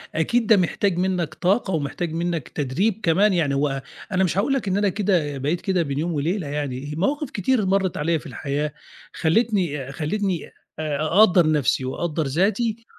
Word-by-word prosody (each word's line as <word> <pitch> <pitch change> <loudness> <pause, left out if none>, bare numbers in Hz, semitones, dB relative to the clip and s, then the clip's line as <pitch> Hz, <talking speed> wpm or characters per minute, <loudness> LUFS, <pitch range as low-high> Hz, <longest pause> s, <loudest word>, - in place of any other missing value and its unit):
أكيد 225 +9 +1
ده 220 - +6
محتاج 185 +1 +1
منك 180 -4 0
طاقة 190 +3 +1
ومحتاج 160 +2 -2
منك 170 -3 -2
تدريب 180 - -1
كمان، 195 +5 +3
يعني 155 -6 +1
هو 135 -1 0 0.3
أنا 190 -1 +2
مش 185 0 0
هاقول 235 +7 +2
لك 265 -6 -1
إن 190 0 +1
أنا 205 0 +2
كده 180 -8 0
بقيت 150 +6 -1
كده 190 -3 +1
بين 140 -2 -3
يوم 170 +2 -1
وليلة 160 +4 -1
يعني، 145 -1 -4
مواقف 285 - -1
كتير 215 +1 +1
مرِّت 190 -1 +1
عليَّ 160 +2 +1
في - - -16
الحياة 145 +1 -3 0.4
خلّتني 165 - 0
خلّتني 175 +4 -2 0.3
آآ 155 -2 -1
أقدّر 175 -1 +5
نَفْسي 135 -3 +1
وأقدّر 160 +4 -2
ذاتي 215 - 0
170 Hz, 170 wpm, -23 LUFS, 150-195 Hz, 0.4 s, ده